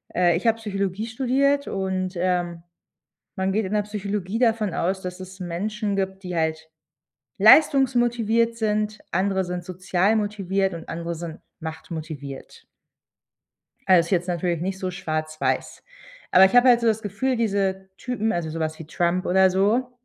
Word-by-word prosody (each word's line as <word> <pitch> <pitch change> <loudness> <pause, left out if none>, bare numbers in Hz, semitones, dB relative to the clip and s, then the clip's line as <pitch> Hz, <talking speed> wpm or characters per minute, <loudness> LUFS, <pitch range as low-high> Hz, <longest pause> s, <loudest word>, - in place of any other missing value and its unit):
äh, 175 -1 +3
ich 200 - -2
habe 225 0 +3
Psychologie 200 -1 -3
studiert 275 +4 +1
und, 190 -1 -2
ähm, 175 -2 -1 0.7
man 190 0 0
geht 210 0 0
in 195 - -4
der 210 - +2
Psychologie 205 0 -3
davon 225 -6 +1
aus, 190 +3 -1
dass 180 0 -6
es 185 +1 -10
Menschen 200 +4 -3
gibt, 190 0 -3
die 180 -1 -5
halt 160 0 -1 0.7
leistungsmotiviert 240 -5 +4
sind, 215 -1 -1
andere 190 +1 +1
sind 180 0 -5
sozial 185 +3 0
motiviert 195 -3 -1
und 165 - -9
andere 170 0 -4
sind 165 0 -7 0.2
machtmotiviert. 155 -3 -8 1.2
Äh, 185 -2 +7
ist 170 - -1
jetzt 180 -1 +1
natürlich 175 -1 -1
nicht 190 +1 -3
so 185 -1 -3
schwarz-weiß. 155 -3 -3 0.5
Aber 190 +1 +8
ich 190 - +1
habe 245 +1 +7
halt 240 -1 +5
so 230 - +2
das 220 0 +1
Gefühl, 215 +6 -1
diese 195 -3 -1
Typen, 225 -3 -2
also, 170 -2 -2
sowas 155 0 -3
wie 155 - -9
Trump 175 +2 0
oder 190 +1 +4
so 215 +7 +1
190 Hz, 155 wpm, -24 LUFS, 175-215 Hz, 1.2 s, Aber